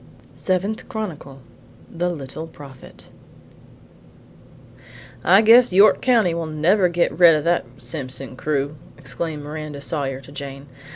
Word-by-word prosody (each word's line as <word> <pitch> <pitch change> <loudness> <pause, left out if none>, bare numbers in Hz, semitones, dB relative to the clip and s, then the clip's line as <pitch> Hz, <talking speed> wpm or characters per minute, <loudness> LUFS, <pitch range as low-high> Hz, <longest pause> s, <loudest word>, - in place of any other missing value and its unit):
Seventh 195 +3 -2
Chronicle. 155 -11 -6 0.5
THE 175 +1 -2
LITTLE 155 -1 -6
PROPHET 140 -4 -14 1.7
I - - -23 0.6
"I - - +6
guess 235 +2 +6
York 200 +3 +5
County 225 -9 +3
will 165 -1 -3
never 175 +5 +2
get 170 0 +1
red 170 -3 +8
of 150 - -1
that 170 +1 +1
Simpson 135 -3 -6
crew!" 145 +1 -2 0.2
exclaimed 150 +2 -5
Miranda 150 -1 -7
Sawyer 140 -2 -3
to 135 +1 -15
Jane. 140 -1 -8
155 Hz, 125 wpm, -21 LUFS, 140-180 Hz, 1.7 s, red